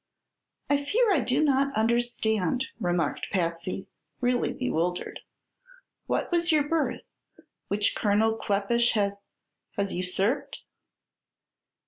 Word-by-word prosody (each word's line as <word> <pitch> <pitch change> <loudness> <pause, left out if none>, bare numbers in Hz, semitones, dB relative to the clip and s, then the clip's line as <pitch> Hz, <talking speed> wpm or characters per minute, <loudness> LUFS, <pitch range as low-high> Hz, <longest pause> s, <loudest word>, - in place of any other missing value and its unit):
"I 285 0 +2
fear 435 +7 +3
I 325 - +3
do 255 +4 +1
not 275 -1 +2
understand," 230 -1 +1
remarked 175 -4 -1
Patsy, 170 0 -2 0.3
really 245 0 +1
bewildered. 180 -9 -2 0.9
"What - - -1
was 345 0 +2
your 305 -2 +4
berth, 300 -5 0 0.7
which 205 0 +1
Colonel 220 +1 +2
Kleppish 225 +4 +1
has 200 -2 0 0.6
has 200 -1 -1
usurped?" 190 +7 -1
225 Hz, 100 wpm, -27 LUFS, 200-270 Hz, 0.9 s, your